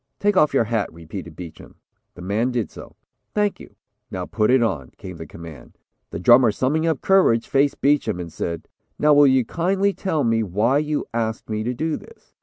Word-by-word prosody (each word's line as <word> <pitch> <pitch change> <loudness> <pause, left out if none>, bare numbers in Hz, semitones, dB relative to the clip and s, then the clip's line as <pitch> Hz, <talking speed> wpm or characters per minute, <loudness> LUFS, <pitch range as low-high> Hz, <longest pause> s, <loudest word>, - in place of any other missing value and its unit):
"Take 205 0 +1
off 155 -5 +4
your 135 - +3
hat," 110 -2 -2
repeated 85 +1 -9
Beacham. 85 -2 -11 0.4
The 90 - -10
man 105 +6 0
did 120 -4 -2
so. - - -12 0.4
"Thank 210 -1 0
you; - - -14 0.3
now - - -4
put 105 - 0
it 130 -1 +4
on," 80 - -2
came 90 -2 -9
the 80 - -8
command. 80 -6 -12 0.3
The - - -6
drummer 120 +4 +6
summing 150 +9 0
up 160 -4 0
courage, 185 -12 +3
faced 140 +1 +1
Beacham 135 -9 +1
and 85 -2 -7
said, 85 -1 -4 0.3
"Now 150 0 +4
will 145 0 +6
you 130 -2 +3
kindly 195 - 0
tell 160 -8 -1
me 115 -1 +2
why 110 +7 +1
you 150 0 -2
asked 115 -1 -3
me 110 0 -1
to 125 +1 -2
do 160 +4 -2
this?" 460 - -17
120 Hz, 200 wpm, -22 LUFS, 95-150 Hz, 0.4 s, drummer